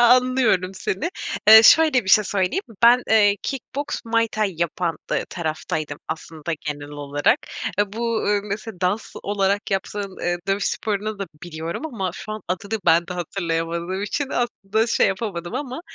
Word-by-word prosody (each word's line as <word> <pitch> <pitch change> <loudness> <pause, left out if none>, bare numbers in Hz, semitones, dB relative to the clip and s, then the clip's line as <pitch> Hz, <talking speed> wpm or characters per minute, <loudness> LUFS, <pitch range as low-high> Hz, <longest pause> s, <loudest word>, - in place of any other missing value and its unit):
a 240 +1 +8
anlıyorum 250 -8 +2
seni. 190 - -2 0.4
Eee, 220 0 +11
şöyle 300 -1 +6
bir - - -7
şey 215 0 +6
söyleyeyim. 195 - 0 0.2
Ben, 245 +2 +7
eee, 205 -2 +5
kickboks, 275 +1 -4
Muay 230 0 +1
Thai 210 -4 0
yapan, 170 -1 -1
dı - - 0
taraftaydım 155 -2 -3
aslında 160 0 -5
genel 145 -1 -4
olarak. 145 0 +1 0.5
Bu, 225 +2 -2
eee, 205 0 +2
mesela, 210 -1 -6
dans 190 +4 -1
olarak 200 0 0
yaptığın, 195 0 -3
eee, 175 0 -1
dövüş 195 +1 +1
sporunu 215 0 -2
da 195 - -3 0.2
biliyorum 170 - -5
ama 205 -11 -3
şu 215 - -7
an 215 - -6
adını 200 +4 -2
ben 170 +1 +5
de 180 - -5
hatırlayamadığım 170 +1 -2
için 270 +7 -2
aslında 220 -2 0
şey 230 - +3
yapamadım 190 -2 -3
ama, 265 +2 -4
200 Hz, 160 wpm, -22 LUFS, 175-225 Hz, 0.5 s, Eee